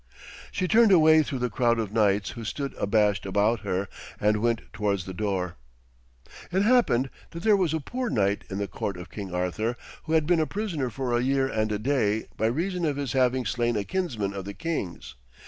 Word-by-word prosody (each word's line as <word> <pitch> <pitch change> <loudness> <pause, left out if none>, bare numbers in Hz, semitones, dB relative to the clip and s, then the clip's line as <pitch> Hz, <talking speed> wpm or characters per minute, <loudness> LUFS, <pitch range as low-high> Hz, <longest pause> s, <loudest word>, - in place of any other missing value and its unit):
She 185 - -1
turned 220 +1 +5
away 160 -3 +7
through 140 -2 -3
the 125 -1 -2
crowd 120 0 +2
of 110 -3 -2
knights 105 -2 +2
who 115 - -8
stood 140 +4 -4
abashed 105 0 +2
about 105 +4 +1
her, 95 -1 -2 0.3
and 105 +1 +3
went 115 -1 +1
towards 100 -4 -1
the 95 - -6
door. 90 -3 -2 0.9
It 190 +2 +2
happened 205 - +3 0.2
that 170 +1 -8
there 215 -2 +5
was 185 -6 +1
a 160 - 0
poor 250 - -3
knight 100 - +1
in 95 - -4
the 100 0 -2
court 100 -1 -4
of 90 +1 -10
King 100 -3 -6
Arthur, 90 +7 -1 0.3
who 160 - -2
had 160 -2 +3
been 170 +1 +3
a 155 - +1
prisoner 180 - -2
for 125 +1 -2
a 120 - +2
year 135 +1 +2
and 110 -4 -1
a 105 - 0
day, 110 -3 0
by 110 - +1
reason 175 +9 -1
of 150 -3 +1
his 140 -4 -2
having 130 -1 +2
slain 120 +2 0
a 105 - 0
kinsman 120 - -2
of 100 -1 -5
the 100 - -7
king's. 165 - -4
120 Hz, 210 wpm, -26 LUFS, 100-155 Hz, 0.9 s, away